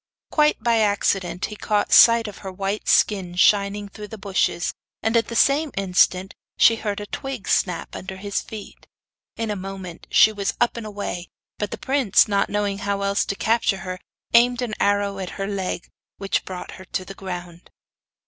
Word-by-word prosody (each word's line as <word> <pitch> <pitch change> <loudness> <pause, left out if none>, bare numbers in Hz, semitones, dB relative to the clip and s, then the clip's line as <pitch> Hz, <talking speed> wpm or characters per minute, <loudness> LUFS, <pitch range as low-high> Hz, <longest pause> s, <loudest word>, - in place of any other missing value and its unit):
Quite 300 -1 +3
by 235 -1 +3
accident 195 -4 +1
he 210 - -7
caught 210 0 0
sight 230 -1 +7
of 205 - -9
her 190 - -7
white 195 +2 -3
skin 190 -4 +2
shining 200 +3 +3
through 210 +1 -9
the 220 - -9
bushes, 195 -3 0 0.3
and 225 +1 +1
at 230 - +3
the 230 - -6
same 285 +5 +3
instant 185 0 +2 0.2
she 230 - +6
heard 205 -2 -3
a 205 - -5
twig 265 0 -6
snap 180 -3 0
under 190 +1 -7
his 200 +1 -2
feet. 215 -2 -10 0.5
In 225 -1 -2
a - - -2
moment 190 -2 -8
she 220 - +6
was 200 -2 -2
up 240 - +2
and 230 -2 -6
away, 200 -4 -5 0.3
but 210 - -2
the - - -5
prince, 265 -7 +3
not 200 -1 +1
knowing 205 -1 -1
how 200 -1 -2
else 200 0 +1
to 200 - -3
capture 220 -3 +1
her, 185 0 -5 0.3
aimed 245 +1 +5
an 230 -3 -3
arrow 200 -1 +1
at 185 -2 -4
her 195 - -2
leg, 195 -3 -3 0.3
which 195 0 -1
brought 185 -1 -7
her 185 - -11
to 185 0 -4
the 195 - -8
ground. 175 -3 -8
200 Hz, 185 wpm, -23 LUFS, 190-220 Hz, 0.5 s, sight